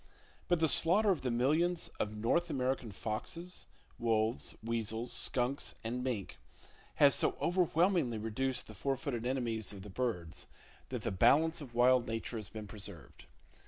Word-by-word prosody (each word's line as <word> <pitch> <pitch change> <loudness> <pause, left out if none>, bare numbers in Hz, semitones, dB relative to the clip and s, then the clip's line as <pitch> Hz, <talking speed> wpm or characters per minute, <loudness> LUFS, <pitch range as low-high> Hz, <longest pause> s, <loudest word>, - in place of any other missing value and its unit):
But 175 -2 +2
the 160 - +4
slaughter 195 +7 +6
of 180 - 0
the 130 - -1
millions 155 +9 +1
of 105 0 -2
North 170 +11 +1
American 130 -4 -1
foxes, 125 - -5 0.3
wolves, 115 0 0
weasels, 115 +1 -2
skunks, 130 +2 0
and 120 +2 -3
mink 120 -7 -3 0.6
has - - +6
so - - +1
overwhelmingly 175 - +2
reduced 125 +4 -2
the 110 - -11
four 135 +7 -1
footed 125 -4 -3
enemies 115 -5 -1
of 100 -2 -9
the 105 - -9
birds 95 -8 -3 0.4
that - - -4
the - - -1
balance 160 - +4
of 125 -5 -10
wild 125 0 +4
Nature 115 +1 -3
has 105 -3 -4
been 110 +1 -7
preserved. 100 - -8
120 Hz, 155 wpm, -33 LUFS, 110-150 Hz, 0.6 s, slaughter